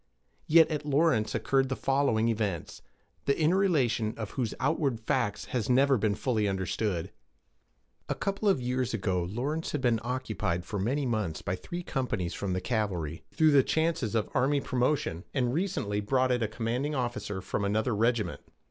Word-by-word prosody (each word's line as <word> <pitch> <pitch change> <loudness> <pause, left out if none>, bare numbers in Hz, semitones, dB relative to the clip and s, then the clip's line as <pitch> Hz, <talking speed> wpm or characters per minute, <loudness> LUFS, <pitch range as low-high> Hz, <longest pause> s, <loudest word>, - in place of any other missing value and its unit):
Yet 160 0 +7
at 150 -1 -2
Lawrence 145 -6 +2
occurred 135 -1 +1
the 130 - -1
following 135 -6 +1
events, 105 -7 -2 0.4
the 140 - +1
inner 160 +4 +3
relation 130 - +1
of 110 -3 -5
whose 120 -5 -2
outward 140 -4 0
facts 115 -4 -1
has 120 -3 -1
never 135 +2 +5
been 110 -3 +1
fully 110 -3 0
understood. 95 -1 -2 1.0
A - - 0
couple 200 +1 0
of 190 - +3
years 125 -1 -1
ago, 95 -4 0
Lawrence 130 - -3
had 145 - -1
been 120 -3 +2
occupied 110 -9 -2
for 100 - -4
many 135 +8 0
months 105 -10 -2
by 90 - -1
three 175 - -6
companies 110 - -2
from 100 -2 -2
the 90 - 0
th - - -9
Cavalry, 90 -9 -1
though 155 -1 +5
the 140 -2 +7
chances 160 -6 0
of 110 - +1
army 140 +2 +2
promotion 125 - 0
had 125 -3 +1
recently 135 - -1
brought 130 +4 +2
it 125 -1 +1
a 110 - +1
commanding 120 +7 -2
officer 120 -6 -2
from 100 +2 -3
another 110 +4 +1
regiment. 110 -3 0
120 Hz, 175 wpm, -29 LUFS, 105-140 Hz, 1.0 s, Yet